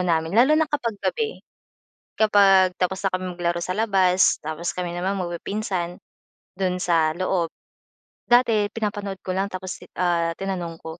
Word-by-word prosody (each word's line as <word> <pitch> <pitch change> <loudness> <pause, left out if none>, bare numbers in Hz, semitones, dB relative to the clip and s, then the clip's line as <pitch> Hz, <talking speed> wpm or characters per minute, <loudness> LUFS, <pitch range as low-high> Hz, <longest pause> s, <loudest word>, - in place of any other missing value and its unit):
namin. 165 -1 0
Lalo 265 +6 +6
na 320 - +4
kapag 240 -8 -2
gabi, 450 -1 -2 0.8
kapag 195 -4 +5
tapos 185 +1 0
na - - -3
kaming 180 -1 -5
maglaro 175 0 -1
sa 185 - -3
labas, 190 -4 +3
tapos 160 +2 -4
kami 180 -1 -3
naman 180 +3 -2
magpipinsan, 180 0 -3 0.6
do'n 180 -1 -1
sa 160 -3 +2
loob. 180 -2 -1 0.7
Dati 230 -4 +4
pinapanood 205 -3 -3
ko 185 - -3
lang 195 +1 0
tapos, 185 0 -6
ti - - -14
ah, 170 -2 +1
tinanong 180 -4 -4
ko. 160 +1 -8
185 Hz, 155 wpm, -23 LUFS, 175-205 Hz, 0.8 s, Lalo